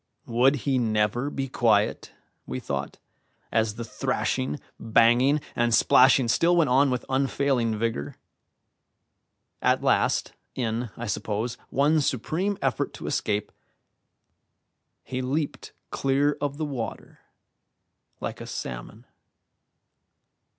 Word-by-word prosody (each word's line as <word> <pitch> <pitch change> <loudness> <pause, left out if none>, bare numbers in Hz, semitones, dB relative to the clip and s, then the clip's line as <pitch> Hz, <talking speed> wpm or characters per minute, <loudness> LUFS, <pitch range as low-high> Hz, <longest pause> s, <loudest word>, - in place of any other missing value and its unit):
Would 125 +4 +3
he 135 -2 +2
never 110 +3 0
be 135 -2 -3
quiet? 110 -5 +1 0.4
we 65 - -4
thought, 70 +1 -4 0.5
as 110 -2 +1
the 115 - -5
thrashing, 75 - -2 0.2
banging, 120 +6 +4 0.2
and 120 -1 +3
splashing 130 +1 +5
still 170 +9 +3
went 160 -7 +3
on 135 +2 +5
with 125 -1 -2
unfailing 130 -4 +1
vigour. 105 -11 -2 1.5
At - - +2
last, - - +2 0.2
in, 115 -1 -2
I 120 - -5
suppose, 110 +2 -2
one 150 +3 +3
supreme 165 - -1
effort 135 -4 -1
to - - -9
escape, 105 0 -1 1.5
he 130 +2 -4
leaped 140 +4 -3 0.2
clear 140 +2 +1
of 145 -1 -2
the 155 - -2
water 125 -7 -6 1.0
like - - -5
a - - -7
salmon. - - -7
125 Hz, 110 wpm, -26 LUFS, 110-140 Hz, 1.5 s, splashing